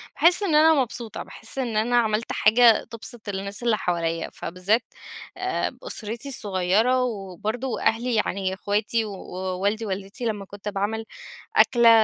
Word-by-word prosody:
باحسّ 355 +4 +4
إنه 315 -6 +4
أنا 320 +1 +7
مبسوطة، 235 -3 -5
باحسّ 225 - -9
إن 235 -4 -1
أنا 240 +3 +2
عملت 220 -1 +1
حاجة 225 +1 +5
تبسط 230 -1 -7
الناس 200 +2 -5
اللي 230 -3 +2
حواليّا، 165 -3 -1
فبالذات 185 +7 0 0.5
آآ، 375 0 -2
أسرتي 230 - -3
الصغيرة، 215 +2 +1
وبرضه 220 +3 -3
أهلي 230 +2 +1
يعني 195 -3 0
اخواتي 210 +3 0
ووالدي 195 +2 -3
والدتي 195 +4 -5
لمَّا 210 -3 -2
كنت 205 +1 -7
باعمل 210 +2 -2 0.5
أكلة 235 -2 +6
220 Hz, 135 wpm, -24 LUFS, 195-240 Hz, 0.5 s, أنا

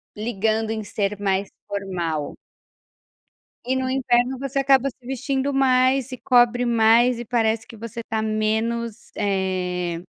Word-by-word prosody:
ligando 220 0 -1
em 220 -1 -3
ser 205 0 -2
mais 195 0 0 0.2
formal. 175 -7 -3 1.3
E, 255 +2 -1
no 260 0 -1
inverno, 255 -1 +1
você 275 +1 -2
acaba 275 0 +4
se 250 -1 -19
vestindo 270 +1 -2
mais, 260 -1 +3
se 255 -2 -7
cobre 245 0 +3
mais, 235 +1 +4
e 240 - -6
parece 225 -1 0
que - - -12
você 230 +1 -7
está 220 -1 -3
menos, 220 +1 -2
eh, 180 -3 -1
230 Hz, 135 wpm, -23 LUFS, 205-255 Hz, 1.3 s, acaba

